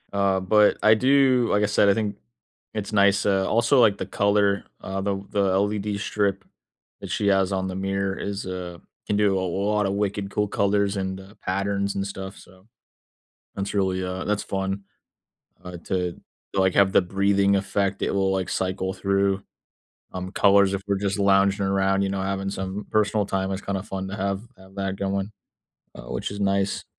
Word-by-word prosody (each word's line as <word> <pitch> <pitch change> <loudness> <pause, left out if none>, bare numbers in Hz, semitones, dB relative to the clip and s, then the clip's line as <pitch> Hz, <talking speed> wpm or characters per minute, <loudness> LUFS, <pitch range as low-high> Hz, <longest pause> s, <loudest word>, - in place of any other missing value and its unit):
Uh, 100 -1 +2
but 105 +3 +4
I 110 - +6
do, 130 0 +3
like 105 - +3
I - - +3
said, 100 0 +3
I - - +6
think 105 -1 -2 0.6
it's 105 0 -4
nice, 100 -1 +4
uh, 95 -1 +2
also 120 +4 +4
like 105 -4 +4
the - - -4
color, 100 0 +1 0.2
uh, 95 +1 -4
the 100 0 -2
the 100 - +1
LED 100 +1 0
strip 100 -1 -1 0.6
that - - -7
she 105 - 0
has 95 -1 +3
on 95 -1 -1
the 95 - -5
mirror 95 0 -2
is, 100 0 -4
uh 90 -2 -6 0.3
can 105 - +1
do 100 -2 +3
a - - -1
l 95 +2 -2
lotta 105 -2 +1
wicked 100 0 -2
cool 105 +1 0
colors 100 0 +1
and, 95 -1 -3
uh, 95 +2 -13
patterns 100 +1 -1
and 100 0 -2
stuff, 95 0 -7
so. 95 +1 -18 0.9
That's 100 +1 -3
really, 95 -2 0
uh, 90 0 -4
that's 105 0 -1
fun, 95 0 -3 0.8
uh, 90 -1 -7
to 90 -2 -2 0.3
like 95 -1 +2
have 100 -1 +5
the - - +6
breathing 100 +2 +2
effect, 100 0 -1
it - - +1
will 95 -1 +1
like 95 -1 -1
cycle 95 0 -2
through, 100 0 0 0.7
um, 95 0 -5
colors 100 -1 +4
if 100 - -3
we're 100 -1 +1
just 100 0 -1
lounging 100 0 +3
around, 95 0 +1
you 100 - 0
know, 95 0 -2
having 95 0 -2
some 95 +1 -5
personal 105 -1 +2
time, 95 -1 -2
it's 95 0 -4
kinda 95 -1 -3
fun 95 -2 -5
to 95 - -5
have 100 0 -2 0.2
have 95 0 -17
that 95 -1 -3
going, 100 +1 -2 0.6
uh, - - -10
which - - -3
is 100 - -6
nice. 100 0 0
100 Hz, 190 wpm, -24 LUFS, 95-100 Hz, 0.9 s, I